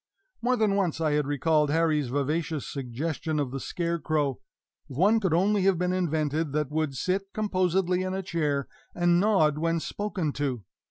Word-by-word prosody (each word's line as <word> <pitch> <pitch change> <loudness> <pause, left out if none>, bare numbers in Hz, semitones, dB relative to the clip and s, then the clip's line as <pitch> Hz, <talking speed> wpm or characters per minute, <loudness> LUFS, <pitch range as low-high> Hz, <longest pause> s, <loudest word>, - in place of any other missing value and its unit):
More 250 +2 +2
than 215 -4 +2
once 190 -5 0
I 155 -2 +1
had 150 -1 +1
recalled 150 +1 +2
Harry's 155 -2 +2
vivacious 150 +3 -1
suggestion 150 +4 -3
of 140 -4 -2
the 135 - -4
scarecrow 155 -4 -1 0.5
if 130 - -8
one 205 +7 +4
could 190 -5 0
only 195 +5 +3
have 195 -2 +4
been 180 +1 0
invented 155 -4 -1
that 150 -2 -1
would 155 -3 -1
sit 190 +5 -1
composedly 185 -3 +1
in 185 0 -2
a 190 - -3
chair 150 -6 -1 0.3
and 175 0 +3
nod 160 -8 +3
when 165 +1 +1
spoken 185 -4 -3
to! 130 -6 -2
165 Hz, 170 wpm, -27 LUFS, 145-185 Hz, 0.5 s, one